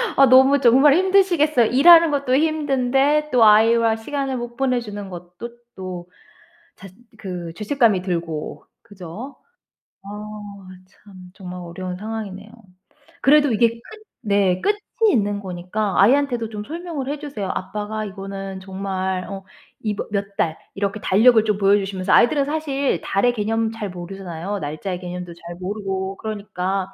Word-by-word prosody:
아 275 - +7
너무 265 +2 +6
정말 265 +4 +6
힘드시겠어요. 355 -8 +3
일하는 330 +4 +7
것도 275 -3 0
힘든데 290 -1 +1
또 245 -3 +4
아이와 225 +1 +5
시간을 270 +3 -3
못 240 0 -6
보내 255 -2 +1
주는 205 -3 -7
것도 180 +5 -9 0.3
또 180 -2 -7 0.7
자 195 - -12 0.3
그 180 -5 -6
죄책감이 220 -3 +1
들고. 170 -4 -4 0.2
그죠? 205 +5 -10 0.7
어 - - -9 0.8
참 200 +1 -20 0.2
정말 180 -2 -9
어려운 180 +1 -6
상황이네요. 210 -1 -6 0.7
그래도 290 0 +5
이게 230 +2 +4
끝 230 0 -12 0.4
네 195 -3 +2
끝이 415 - +1 0.3
있는 205 -3 0
거니까 190 +2 -3
아이한테도 245 +1 +3
좀 210 -1 -6
설명을 325 -3 -5
해 295 +1 -3
주세요. 275 -11 -5
아빠가 210 +3 -4
이거는 195 -1 -7
정말 190 -1 -3
어 195 -1 -7 0.4
이 215 -2 -1
뭐 - - -5
몇 200 -1 -3
달 160 -1 0 0.2
이렇게 200 +1 -3
달력을 220 +3 +5
좀 210 -2 0
보여 200 0 +4
주시면서 195 -2 -2
아이들은 275 +4 +4
사실 285 -2 -1
달의 245 +5 +1
개념 225 0 -1
잘 220 -3 -5
모르잖아요. 180 +1 -6
날짜의 175 +5 -5
개념도 180 -1 -7
잘 170 0 -10
모르고 195 0 -4
그러니까. 195 -3 -4
210 Hz, 310 characters per minute, -21 LUFS, 190-255 Hz, 0.8 s, 아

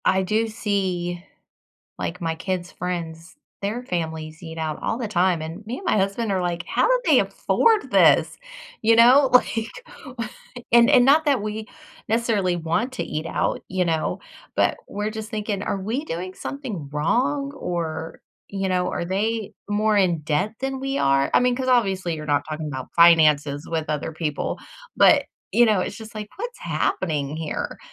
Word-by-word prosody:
I 190 0 +3
do 215 +4 +1
see, 185 -5 -2 0.8
like, 180 - -4
my 165 -1 -1
kids' 180 +1 -4
friends, 170 -1 -5 0.2
their 210 +5 -3
families 160 -5 -4
eat 160 -1 -8
out 155 -1 -3
all 225 - -1
the 240 - -2
time, 180 -4 +1
and 165 +6 -7
me 245 +4 -4
and - - -11
my - - +2
husband 200 +3 0
are 185 -1 0
like, 175 -1 -2
"How - - +1
do - - +3
they - - +5
afford 445 -2 +1
this?" - - +5 0.4
You 225 +1 +4
know, 255 +4 +7
like 230 -2 +3 1.0
and 235 +2 +7
and 255 -4 +6
not 295 +4 +5
that 280 -5 +3
we 215 +1 -4 0.4
necessarily 215 -5 +1
want 170 +10 -1
to - - -3
eat 155 +1 -4
out, - - -1
you 185 -1 0
know? 160 -2 -1 0.4
But - - +2
we're 210 +1 -3
just 220 -1 -7
thinking, 210 -2 -3
"Are 200 - -2
we 230 +10 -2
doing 185 - -5
something 225 - -6
wrong 275 - 0
or, 165 - -4 0.3
you 195 -1 -2
know, 180 -1 +1
are - - -3
they 210 +4 -1 0.2
more 210 +1 +2
in 180 -5 +2
debt 185 +9 -1
than 270 0 -3
we 270 +1 -2
are?" 135 0 +2
I - - +7
mean, 250 0 +2
'cause 260 0 -2
obviously 195 -8 +2
you're 155 0 -7
not 145 -1 +2
talking 155 0 -4
about 130 -4 -5
finances 155 -4 +5
with 160 -2 -1
other 150 +1 -2
people, 155 -2 -3 0.4
but, - - +6 0.3
you 240 - +5
know, 215 -3 +3
it's 200 - -4
just 220 0 -11
like, 210 -1 -5
"What's 480 +3 -5
happening 150 -5 -1
here?" 160 -1 -4
190 Hz, 175 wpm, -23 LUFS, 165-230 Hz, 1.0 s, know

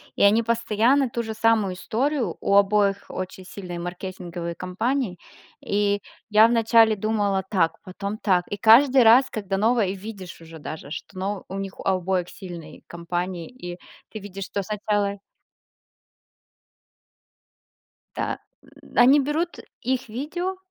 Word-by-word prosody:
И - - -3
они 215 +3 +5
постоянно 235 +3 +2
ту 235 0 -3
же 220 0 -5
самую 220 -4 +2
историю, 235 - -1
у 200 - +1
обоих 200 0 +3
очень 185 0 -6
сильные 180 -3 -7
маркетинговые 175 -1 -5
кампании, 195 +4 -2 0.5
и 205 0 +1 0.3
я 215 +1 +7
вначале 225 -1 +4
думала 205 -2 0
так, 170 -5 +1
потом 200 +3 -5
так, 180 -4 +1
и 205 - -4
каждый 255 +5 +6
раз, 245 +4 +6
когда 195 -3 -3
новое 220 -1 +2
и 190 - -2
видишь 195 -3 -9
уже 160 -1 -11
даже, 150 -1 -8
что, 190 - -8
ну, 195 +1 -3
у 190 - -6
них 195 -1 -6
у - - -7
обоих 185 -1 0
сильные 175 -4 -10
кампании, 175 0 -4
и 180 -8 -9 0.3
ты 215 - -6
видишь, 195 -1 -7
что 200 - -3
сначала 205 0 -1 3.0
Да. - - -2 0.6
Они 260 +4 +7
берут 310 +5 -1 0.2
их 255 -3 -2
видео 350 - -3
205 Hz, 135 wpm, -24 LUFS, 185-230 Hz, 3.0 s, я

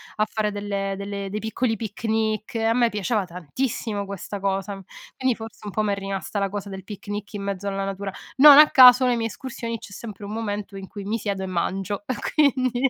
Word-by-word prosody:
a 215 - +2
fare 215 0 -1
delle 200 -1 -2
delle 200 0 -4
dei 210 +2 -3
piccoli 225 +1 -1
picnic. 220 0 -2
E 225 - 0
a 225 0 +3
me 240 0 +4
piaceva 210 -1 -1
tantissimo 200 - -3
questa 200 +1 -6
cosa. 195 0 -2 0.4
Quindi 260 -2 +1
forse 225 -1 -10
un 205 - -5
po' 215 - 0
m'è 205 -2 +1
rimasta 195 +1 -4
la 200 - +1
cosa 200 0 -5
del 190 -1 -8
picnic 205 0 -6
in 205 -1 -5
mezzo 200 0 -3
alla 195 0 -2
natura. 195 0 -4 0.3
Non 285 +1 +10
a 300 0 +9
caso 255 0 +8
le 245 -1 +2
mie 225 0 0
escursioni, 230 -1 -5
c'è - - -12
sempre 205 0 -9
un 200 - -6
momento 210 -2 -4
in 195 -1 -8
cui 205 -2 -8
mi 210 +3 -1
siedo 200 -3 -3
e - - -2
mangio; 190 +3 -2 0.3
quindi, 260 -3 +2
205 Hz, 210 wpm, -24 LUFS, 195-225 Hz, 0.4 s, Non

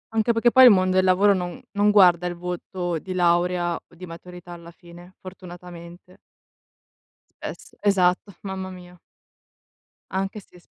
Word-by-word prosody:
Anche 225 +1 +2
perché 235 +1 +2
poi 260 +1 +7
il - - +10
mondo 185 -3 +2
del 185 0 +3
lavoro 190 +2 +4
non 180 -2 -5
non 205 0 +1
guarda 180 -4 +4
il 175 - -5
voto 175 -1 -5
di 185 +2 -7
laurea 175 0 +1
o 170 - -14
di 180 +2 -10
maturità 175 +1 -12
alla 170 -1 -11
fine, 175 +1 -16
fortunatamente. 180 -1 -12 1.2
Es - - -9
esatto, 195 -1 +1
mamma 190 -1 -6
mia. 180 -1 -14 1.1
Anche 195 +3 -3
se 180 -2 -19
s - - -25
180 Hz, 150 wpm, -23 LUFS, 175-190 Hz, 1.2 s, il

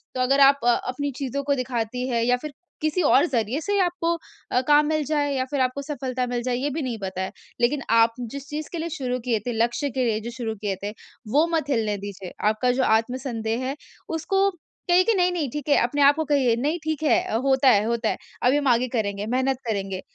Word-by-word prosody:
तो 255 - -1
अगर 270 +2 +3
आप 275 0 +7
अपनी 255 +4 0
चीज़ों 280 0 -3
को 280 0 +1
दिखाती 250 -1 -2
हैं, 235 -2 0
या 245 +1 +3
फिर 300 +3 -7 0.3
किसी 310 +4 +1
और 285 -1 +5
ज़रिए 245 -2 -1
से 405 +2 0
आपको 345 -2 0 0.4
अ, 250 - +3
काम 295 0 +6
मिल 310 -1 +1
जाए 290 -1 0
या 260 - 0
फिर 280 -2 0
आपको 255 +2 0
सफलता 260 -3 -3
मिल 245 0 -2
जाए 250 0 0
ये 270 +4 -1
भी 305 +3 -3
नहीं 250 -5 -3
पता 190 -1 -4
है। 190 - -3 0.3
लेकिन 270 +4 +2
आप 230 0 +5
जिस 270 +4 -6
चीज़ 300 +1 -5
के 345 - -4
लिए 330 +1 -3
शुरू 255 -5 -3
किए 235 -3 +1
थे, 245 +4 -4
लक्ष्य 235 +5 0
के 260 0 -1
लिए 220 -2 +1
जो 235 - -5
शुरू 225 -3 -3
किए 200 -2 -1
थे, 205 - -2 0.4
वो 290 +9 +3
मत 310 -3 -1
हिलने 220 -6 0
दीजिए। 195 -2 -8 0.2
आपका 230 +4 +2
जो 260 +1 +1
आत्मसंदेह 230 0 0
है 270 +2 -2 0.3
उसको 385 +5 +1 0.4
कहिए 355 +1 +6
कि 460 - +3
नहीं-नहीं 355 - +1
ठीक 295 -2 -5
है, 285 - +6
अपने 265 +5 0
आप 285 +1 +7
को 315 - -1
कहिए, 275 -5 +2
नहीं 290 +8 -1
ठीक 315 -1 -2
है, 310 - +4 0.2
होता 270 0 +4
है 210 -4 +5
होता 230 -1 0
है। - - -2 0.3
अभी 255 +4 +4
हम 290 -1 0
आगे 245 0 +3
करेंगे, 200 -2 -1
मेहनत 260 +3 0
करेंगे। 195 -3 -2
255 Hz, 230 wpm, -24 LUFS, 230-290 Hz, 0.4 s, आप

